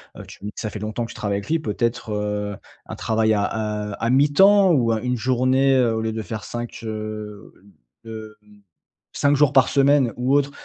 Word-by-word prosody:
heu, - - -9
tu - - -14
me 105 - -4
dis - - -12
que - - -7
ça 110 - -3
fait 105 - -7
longtemps 110 +3 -3
que - - -11
tu - - -13
travailles 100 -1 -2
avec 100 - -11
lui, 165 - +2
peut-être, 120 -4 -2
heu, 105 0 -3 0.3
un - - -7
travail 110 -1 +1
à, 105 0 -2
heu, - - -5
à 115 - -1
mi-temps 190 +8 +5
ou 120 -5 +2
heu, 110 - -3
une 125 0 -1
journée 130 +2 +2
au 110 -1 0
lieu 110 0 -2
de 110 - -3
faire 110 -1 -6
5, 120 0 -6
heu, 110 -1 -6 0.5
hem, 110 -1 -9 0.8
5 145 0 +2
jours 145 -1 +3
par 135 - +5
semaine 140 -3 +3
ou 125 +3 +1
autre, 140 0 +1
115 Hz, 215 wpm, -22 LUFS, 110-135 Hz, 0.8 s, mi-temps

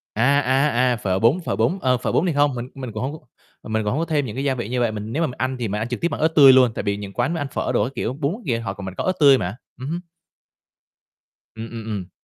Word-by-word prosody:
À, 140 +6 +3
à, 135 +3 +2 0.2
à, - - +1
phở 95 -3 -1
bún, 120 +11 +3
phở - - -1
bún, 190 - +1
ờ, 130 -1 +2
phở - - -2
bún 175 - +2
thì 175 - +1
hông, 145 -2 +2
mình 120 +2 -5
mình 130 -4 -6
cũng 110 +4 -4
hông 140 +3 -2
c 155 - -10 0.4
mình 110 0 -1
cũng 105 - -1
hông 145 - -1
có 165 - 0
thêm 150 -4 0
những 110 -1 -6
cái 135 - -3
gia 135 -2 +1
vị 120 -3 -5
như 125 0 -1
vậy. 120 -2 +1
Mình 105 +1 -6
nếu 165 +3 0
mà - - +1
mình 125 - -8
ăn 130 0 -2
thì 115 - -1
mình 105 +2 -3
ăn 115 - -2
trực 125 - -5
tiếp 170 - +2
bằng 150 - -4
ớt 160 - +5
tươi 135 -3 +9
luôn, 130 -3 +5
tại - - -3
vì 100 -1 -1
những 100 -1 -8
quán 125 +7 0
mà 165 - -2
ăn 145 - -2
phở - - -2
đồ 120 - +2
các 130 - -3
kiểu 125 - -2
bún 145 +4 -2
kìa 115 -4 0
họ 100 -4 -4
mình 95 -1 -6
có - - -3
ớt 185 - +1
tươi 140 -3 +7
mà. 95 0 -3 0.2
Ừm 130 +3 -5
hứm. 170 +2 -2 1.6
Ừm, 115 +1 -7
ừm, 115 -2 -7
ừm. 95 -4 -4
125 Hz, 320 wpm, -22 LUFS, 110-140 Hz, 1.6 s, tươi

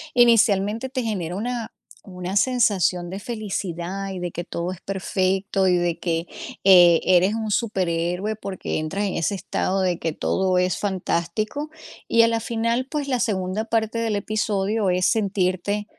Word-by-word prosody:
inicialmente 225 -1 +4
te 255 -2 -2
genera 185 -6 -3
una 235 +2 -3 0.3
una 180 0 -6
sensación 200 -7 +2
de 195 - -5
felicidad 195 -4 -4
y 190 - -5
de 175 -1 -4
que 175 - -5
todo 170 +1 -4
es 185 - -9
perfecto 190 0 0
y 180 - +4
de 170 -1 -1
que, 165 -1 -1 0.4
eh, 175 -3 +7
eres 185 +3 +4
un 220 -1 -3
superhéroe 185 -1 -1
porque 195 -6 -4
entras 190 +7 -2
en 195 - -2
ese 170 +5 0
estado 190 0 -1
de 180 -2 0
que 165 - -1
todo 185 +3 0
es 180 -1 +1
fantástico. 205 - -2 0.4
Y 230 - +5
a 230 - +5
la 230 0 0
final, 230 +2 -1
pues 295 -2 -3
la 255 -3 0
segunda 205 -2 -1
parte 225 0 -1
del 225 -2 0
episodio 210 0 0
es 180 0 +1
sentirte 200 -1 0
195 Hz, 160 wpm, -23 LUFS, 180-220 Hz, 0.4 s, eh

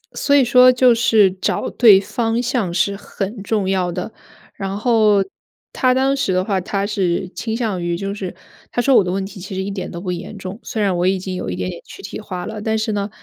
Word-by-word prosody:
所 285 - +2
以 280 - +6
说 250 +1 +7
就 250 -1 +5
是 225 -4 +4
找 185 0 -2
对 215 -6 +6
方 225 +3 -1
向 240 -7 -1
是 200 +3 +1
很 200 +1 -5
重 200 -1 -1
要 185 -2 0
的， 175 - -5 0.4
然 195 0 -4
后 215 -3 +3 0.5
他 255 -2 +2
当 265 +2 +2
时 235 -9 0
的 185 0 +1
话， 195 -3 0
他 195 +2 -2
是 190 -3 -1
倾 220 +3 -4
向 215 -7 -2
于 170 0 -1
就 195 +2 -3
是 195 -3 -6 0.4
他 245 - 0
说 270 +1 +3
我 - - +6
的 180 - -2
问 190 +1 -2
题 195 0 -10
其 190 +1 -7
实 190 - -2
一 200 - -4
点 190 -2 -5
都 170 - -7
不 185 -1 -3
严 180 +4 -6
重。 190 +2 -7
虽 220 - -3
然 195 -3 +1
我 175 +1 +1
已 190 +1 +2
经 185 0 -5
有 180 - -4
一 - - -3
点 - - -3
点 - - -8
躯 - - -12
体 - - -6
化 185 -4 -6
了， 220 -1 -6
但 220 +1 0
是 220 0 -1
呢， 205 -1 -2
200 Hz, 265 characters per minute, -19 LUFS, 190-230 Hz, 0.5 s, 说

